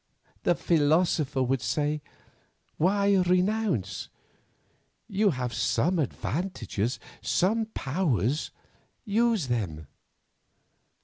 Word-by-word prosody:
The 175 - +2
philosopher 155 -4 +2
would 130 0 0
say, 150 +7 0 0.8
Why 200 +3 +3
renounce? 180 - +1 1.0
You 205 -1 +2
have 125 -6 -2
some 170 +9 +1
advantages, 135 - -2 0.2
some 220 +5 +1
powers, 135 - 0 0.6
use 225 - +2
them. 95 - -2
160 Hz, 75 wpm, -27 LUFS, 130-190 Hz, 1.0 s, Why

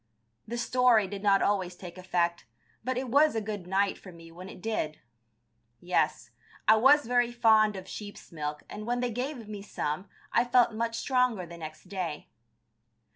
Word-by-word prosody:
This 235 +1 -2
story 245 -4 +4
did 200 +1 -6
not 200 -1 +4
always 185 -3 0
take 175 -1 -10
effect, 175 -6 -1 0.4
but 255 +1 -2
it 255 -1 -3
was 290 +2 +4
a - - +2
good 205 -4 -5
night 195 +1 +1
for 185 - -12
me 165 -1 -14
when 180 +3 -10
it - - -11
did. 175 -7 -3 0.8
Yes, 180 +1 0 0.4
I 220 - +8
was 280 +6 +6
very 245 0 +2
fond 220 -3 +4
of 190 -1 -8
sheep's 205 0 -9
milk 150 -2 -5
and 215 +1 -8
when 245 0 0
they 245 -1 -1
gave 245 0 -4
me 210 -1 -7
some 185 -2 -4 0.2
I 235 - +4
felt 245 -1 +3
much 230 +1 -2
stronger 250 -8 +1
the 170 0 -10
next 155 -1 -8
day. 180 -5 -5
210 Hz, 180 wpm, -29 LUFS, 180-240 Hz, 0.8 s, I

